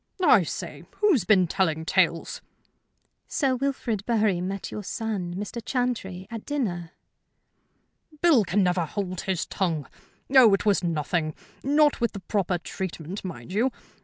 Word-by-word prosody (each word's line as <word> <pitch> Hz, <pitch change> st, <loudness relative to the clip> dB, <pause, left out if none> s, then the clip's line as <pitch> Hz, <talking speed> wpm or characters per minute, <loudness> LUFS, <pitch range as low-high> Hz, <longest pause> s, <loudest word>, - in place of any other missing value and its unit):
"I -, -, +7 dB
say! -, -, -5 dB, 0.2 s
Who's 350 Hz, -, +4 dB
been 185 Hz, -2 st, +5 dB
telling 160 Hz, -3 st, 0 dB
tales?" 170 Hz, -2 st, +1 dB, 0.9 s
"Sir 270 Hz, -3 st, +1 dB
Wilfrid 250 Hz, -6 st, -2 dB
Bury 215 Hz, -6 st, +2 dB
met 195 Hz, +1 st, -4 dB
your 210 Hz, -, -4 dB
son, 200 Hz, -4 st, -3 dB
Mr. 205 Hz, +4 st, -5 dB
Chantrey, 235 Hz, -8 st, -2 dB
at 225 Hz, -2 st, -6 dB
dinner." 180 Hz, -, -3 dB, 1.3 s
"Bill 310 Hz, -10 st, +5 dB
can 190 Hz, +2 st, +1 dB
never 180 Hz, -1 st, +1 dB
hold 185 Hz, +1 st, -4 dB
his 185 Hz, -3 st, -1 dB
tongue. 165 Hz, -7 st, -1 dB, 0.5 s
Oh, 235 Hz, -6 st, +8 dB
it 195 Hz, -, -5 dB
was 205 Hz, -3 st, +3 dB
nothing; 155 Hz, -1 st, -1 dB, 0.3 s
not 295 Hz, 0 st, +3 dB
with 235 Hz, -, +1 dB
the 200 Hz, -, -5 dB
proper 190 Hz, -1 st, -1 dB
treatment, 175 Hz, +1 st, -6 dB
mind 170 Hz, -6 st, -7 dB
you. 230 Hz, +6 st, +2 dB
195 Hz, 140 wpm, -26 LUFS, 175-235 Hz, 1.3 s, Oh